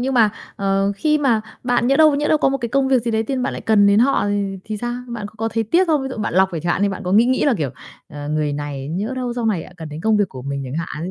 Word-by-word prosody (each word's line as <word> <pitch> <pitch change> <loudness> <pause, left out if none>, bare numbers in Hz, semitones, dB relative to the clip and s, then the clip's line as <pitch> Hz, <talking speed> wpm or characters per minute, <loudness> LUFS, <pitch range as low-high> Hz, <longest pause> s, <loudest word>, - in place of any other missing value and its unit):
nhưng 260 +1 -1
mà, 220 -3 +5 0.3
ờ, 195 0 +1
khi 305 +7 +2
mà 245 -7 +2 0.2
bạn 245 -1 +1
nhỡ 275 +2 +3
đâu 310 -1 +6
nhỡ 295 +1 0
đâu 310 - +3
có 275 - +3
một 275 - -1
cái 235 -2 -3
công 275 +2 +1
việc 260 -3 +3
gì 235 - -1
đấy 220 0 +1
tự 265 +5 -3
nhiên 255 - -1
bạn - - -1
lại - - -6
cần 210 -2 +4
đến 200 +1 +5
họ 255 -3 +3
thì 200 -1 -2
thì 215 -1 -4
sao? 240 +3 -3
Bạn 230 -4 -5
có 215 - -18
có 225 +1 -1
thấy 225 +1 -1
tiếc 340 - +2
không? 305 -4 +2
Ví 265 - -3
dụ 260 - -6
bạn 210 -5 -3
lọc 190 0 +4
rồi 165 - -3
chẳng 175 +2 0
hạn - - -1
đi, 205 - +3
bạn 195 - -5
có 180 - -1
nghĩ 220 +3 +6
nghĩ 255 +1 +1
là, 280 -5 +3
kiểu, 140 -5 -1 0.4
ờ, 145 -1 -7
người 150 -1 0
này 145 -1 -5
nhỡ 200 +10 -3
đâu 250 -1 -2
sau 240 -2 -2
này 190 -7 0
lại 180 - -14
cần 160 -2 -8
đến 150 +1 -7
công 220 +4 +2
việc 205 -3 +1
của 130 -1 -9
mình 140 0 -4
chẳng 150 +6 -4
hạn 165 +4 -5
215 Hz, 340 wpm, -20 LUFS, 175-250 Hz, 0.4 s, đâu